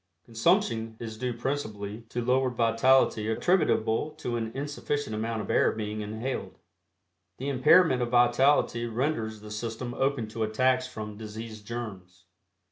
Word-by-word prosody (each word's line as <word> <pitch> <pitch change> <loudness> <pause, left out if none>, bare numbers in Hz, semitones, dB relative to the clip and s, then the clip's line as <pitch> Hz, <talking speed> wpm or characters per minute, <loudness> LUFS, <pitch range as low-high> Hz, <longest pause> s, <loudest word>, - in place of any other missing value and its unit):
Consumption 115 -1 +1
is 110 -2 -6
due 125 +3 -2
principally 110 -5 -4
to 120 -1 -3
lowered 130 0 +2
vitality 115 -1 +3
attributable 115 -2 +2
to 120 - -3
an 115 -1 -2
insufficient 145 -3 -3
amount 110 0 -2
of - - -4
air - - +4
being 105 0 -4
inhaled. 110 +5 -4 0.8
The 135 +3 -3
impairment 135 +1 +5
of 120 - 0
vitality 120 0 +3
renders 115 -3 -2
the 105 0 -10
system 115 +3 -4
open 135 -3 0
to 115 +1 -6
attacks 130 +4 +2
from 105 -4 -7
disease 110 0 -8
germs. 100 -5 -7
115 Hz, 135 wpm, -28 LUFS, 110-130 Hz, 0.8 s, impairment